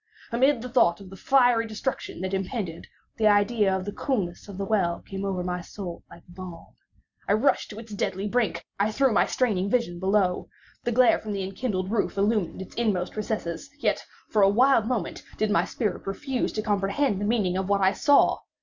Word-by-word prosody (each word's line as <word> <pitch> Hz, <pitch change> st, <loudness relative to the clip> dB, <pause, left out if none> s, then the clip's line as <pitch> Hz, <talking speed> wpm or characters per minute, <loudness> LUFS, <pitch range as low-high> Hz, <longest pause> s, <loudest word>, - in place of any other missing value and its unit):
Amid 250 Hz, +1 st, +3 dB
the 250 Hz, -, -5 dB
thought 210 Hz, -8 st, +3 dB
of 195 Hz, -2 st, -12 dB
the -, -, -9 dB
fiery 245 Hz, -1 st, +3 dB
destruction 220 Hz, -3 st, -4 dB
that 190 Hz, +1 st, -3 dB
impended, 190 Hz, -3 st, -3 dB, 0.3 s
the 220 Hz, -, +3 dB
idea 205 Hz, 0 st, +3 dB
of 185 Hz, -, -5 dB
the 205 Hz, -, -3 dB
coolness 200 Hz, -10 st, -2 dB
of 200 Hz, -2 st, -9 dB
the 195 Hz, -, -2 dB
well 190 Hz, -5 st, +1 dB
came 195 Hz, 0 st, -5 dB
over 190 Hz, -2 st, -2 dB
my 180 Hz, 0 st, -2 dB
soul 175 Hz, -1 st, -8 dB
like 170 Hz, -, -14 dB
balm. 175 Hz, -1 st, -10 dB, 0.5 s
I -, -, +3 dB
rushed 230 Hz, +7 st, +2 dB
to 210 Hz, -, -9 dB
its 225 Hz, -1 st, -9 dB
deadly 195 Hz, 0 st, -2 dB
brink. 235 Hz, 0 st, 0 dB
I 205 Hz, +2 st, +2 dB
threw 265 Hz, +2 st, +2 dB
my -, -, +3 dB
straining 200 Hz, -7 st, 0 dB
vision 200 Hz, -8 st, 0 dB
below. 190 Hz, -1 st, +1 dB, 0.4 s
The 240 Hz, -, +1 dB
glare 250 Hz, +1 st, +5 dB
from 215 Hz, -1 st, -5 dB
the 195 Hz, -1 st, -2 dB
enkindled 190 Hz, -1 st, -3 dB
roof 215 Hz, -2 st, 0 dB
illumined 200 Hz, -3 st, 0 dB
its -, -, -14 dB
inmost 205 Hz, -6 st, -1 dB
recesses. 215 Hz, +1 st, -3 dB
Yet, -, -, 0 dB, 0.3 s
for 215 Hz, -, +3 dB
a 195 Hz, -, +6 dB
wild 235 Hz, +1 st, +4 dB
moment, 230 Hz, -9 st, -2 dB, 0.2 s
did 215 Hz, -1 st, +1 dB
my -, -, +3 dB
spirit 210 Hz, -6 st, -3 dB
refuse 255 Hz, +6 st, -2 dB
to 215 Hz, -, -2 dB
comprehend 205 Hz, +2 st, 0 dB
the -, -, 0 dB
meaning 205 Hz, -5 st, +1 dB
of 190 Hz, +1 st, -2 dB
what 200 Hz, -1 st, +2 dB
I 190 Hz, +1 st, +4 dB
saw. 285 Hz, +5 st, +4 dB
205 Hz, 200 wpm, -26 LUFS, 190-230 Hz, 0.5 s, a